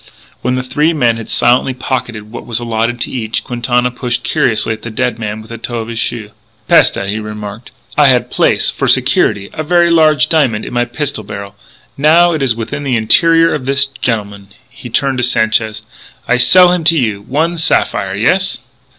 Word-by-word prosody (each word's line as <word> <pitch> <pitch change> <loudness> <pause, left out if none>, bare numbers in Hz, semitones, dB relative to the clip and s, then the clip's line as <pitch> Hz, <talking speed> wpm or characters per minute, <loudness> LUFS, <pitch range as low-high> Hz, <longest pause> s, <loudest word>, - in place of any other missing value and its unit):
When 125 +1 -1
the 130 - -2
three 150 +5 0
men 120 -7 +1
had 115 - -8
silently 125 +2 +2
pocketed 120 -5 -4
what 120 - -8
was 120 -1 -3
allotted 115 +1 -2
to - - -1
each, 110 -3 -3
Quintana 125 0 -1
pushed 120 -1 -3
curiously 110 -1 0
at 110 - -10
the 115 - -7
dead 110 +1 -2
man 110 -1 -5
with 110 - -15
the 115 - -7
toe 120 +1 -5
of 115 0 -5
his 115 -1 -4
shoe. 110 -4 -3 0.4
"Peste!" - - +4
he 105 +2 -3
remarked. 105 +1 -8 0.3
"I 150 -1 +5
had 125 -2 +2
place, - - +2
for - - -2
security, 100 -2 +2
a - - -4
ver' 170 +2 +2
large 155 -4 +4
diamon' 130 -10 +1
in - - -8
my 120 0 +1
pistol 130 -2 -4
barrel. 100 0 -8 0.4
Now 165 +4 +4
it 155 - -2
is 125 -5 +1
within 115 +6 -5
the 135 -3 0
interior 165 +9 +4
of 130 -3 -4
this 140 0 +2
gentleman...." 105 -7 -4 0.2
He 120 - -11
turned 130 +2 0
to - - 0
Sanchez: 110 -2 0 0.4
"I 125 - +2
sell 175 +9 +6
him 180 -2 0
to 165 0 +4
you. 110 -7 -1
One 155 +10 -1
sapphire. 130 - 0
Yes?" 185 - +1
120 Hz, 195 wpm, -14 LUFS, 110-145 Hz, 0.4 s, sell